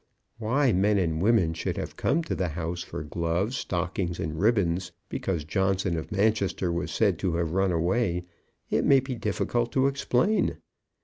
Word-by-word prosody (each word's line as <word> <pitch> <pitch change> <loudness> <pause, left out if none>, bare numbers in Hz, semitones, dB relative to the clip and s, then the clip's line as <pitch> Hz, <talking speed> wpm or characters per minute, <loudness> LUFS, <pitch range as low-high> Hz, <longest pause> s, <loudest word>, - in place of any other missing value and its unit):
Why 125 +4 +2
men 100 +3 +3
and 80 -4 0
women 100 -6 +3
should 80 - -3
have - - -5
come 165 +4 +1
to - - -3
the 90 - -1
house 85 +2 -4
for - - -6
gloves, 85 - -1
stockings, 90 -4 -2
and 80 0 -3
ribbons, 95 -5 +1 0.2
because 85 -6 -2
Johnson 95 +2 0
of 80 +6 -5
Manchester 100 -3 +1
was 85 +1 -2
said 100 -7 +1
to 90 -4 0
have 85 -1 -1
run 95 +1 +2
away, 90 +1 0 0.5
it - - +2
may 135 - +6
be 130 0 -4
difficult 115 +2 -1
to 135 0 +3
explain. 140 - +1
95 Hz, 170 wpm, -27 LUFS, 85-115 Hz, 0.5 s, may